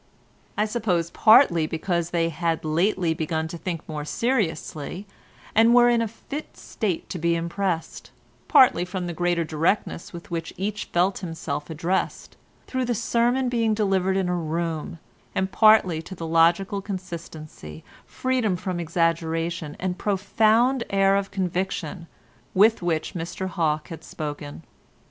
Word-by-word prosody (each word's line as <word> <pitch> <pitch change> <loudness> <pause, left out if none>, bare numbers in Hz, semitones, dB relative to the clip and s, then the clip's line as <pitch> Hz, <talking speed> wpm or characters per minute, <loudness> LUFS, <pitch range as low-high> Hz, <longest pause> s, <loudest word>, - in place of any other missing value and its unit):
I 210 - +2
suppose 200 -7 -1
partly 215 - +5
because 170 +1 -1
they 165 -1 +1
had 165 0 -2
lately 170 +2 +1
begun 160 0 -2
to 170 - -6
think 170 -3 -5
more 150 -2 -4
seriously, 185 - -2 0.5
and 225 +2 +5
were 240 0 +7
in 235 -1 +3
a 230 - 0
fit 280 +7 -8
state 195 -7 -3
to 180 - -4
be 170 +1 +2
impressed, 170 0 -3 0.4
partly 245 -9 +6
from 180 0 -4
the 175 - -4
greater 175 0 0
directness 165 +3 -1
with 170 0 -10
which 165 -1 -4
each 205 +3 -3
felt 180 +3 +1
himself 165 -5 -5
addressed, 165 +4 -2 0.3
through 260 -1 -2
the 240 0 0
sermon 240 +3 +1
being 230 -3 +1
delivered 190 -2 +1
in 190 -2 0
a 180 - 0
room, 165 -1 -3 0.4
and 190 0 0
partly 215 -7 +5
to 190 +4 -9
the 165 - -6
logical 170 +5 +3
consistency, 165 - -8 0.2
freedom 255 -7 0
from 180 0 -4
exaggeration, 165 -1 -1
and 185 -1 -3
profound 220 +5 +2
air 195 0 +3
of 200 0 -1
conviction 185 -2 -3 0.5
with 215 +3 +5
which 165 -3 -1
Mr 175 +2 -4
Hawke 155 -4 -1
had 165 - -8
spoken. 145 0 -6
175 Hz, 145 wpm, -24 LUFS, 165-205 Hz, 0.5 s, were